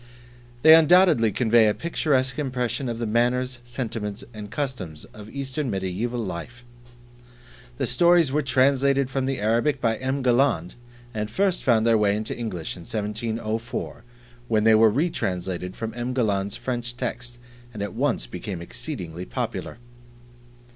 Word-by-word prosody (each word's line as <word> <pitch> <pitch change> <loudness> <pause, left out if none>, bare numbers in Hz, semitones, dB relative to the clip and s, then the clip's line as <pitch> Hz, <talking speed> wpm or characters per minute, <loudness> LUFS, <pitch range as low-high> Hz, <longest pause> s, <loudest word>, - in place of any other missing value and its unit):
They 160 - +10
undoubtedly 165 - +6
convey 115 -1 +4
a 105 - +2
picturesque 140 -5 0
impression 125 -2 -2
of 115 - -3
the 115 - -2
manners, 125 +3 0
sentiments, 115 -4 -4
and 105 -1 -8
customs 115 - -4
of 105 0 -11
Eastern 135 +1 -3
Mediaeval 100 +5 -2
Life. 110 +4 -6 1.1
The 135 - 0
stories 170 +4 +4
were 150 +2 +1
translated 135 0 +2
from 135 -1 -1
the 135 -1 -1
Arabic 115 +7 +1
by 115 -3 +1
M. 130 +1 -2
Galland 120 - +2 0.4
and 105 -1 -3
first 190 - 0
found 115 -3 +3
their 115 -1 +4
way 100 -1 +3
into 110 +1 -3
English 105 -9 -4
in - - -11
1704, 110 +2 -4 0.4
when 110 -2 +2
they 110 0 +6
were 110 +1 +6
retranslated 95 - -2
from 115 -1 -5
M. 120 +1 -3
Galland's 100 -5 0
French 120 -1 -4
text 120 0 -5 0.3
and 105 -3 -5
at 100 - -5
once - - 0
became 90 +9 -6
exceedingly 90 - -6
popular. - - -4
120 Hz, 145 wpm, -24 LUFS, 105-130 Hz, 1.1 s, They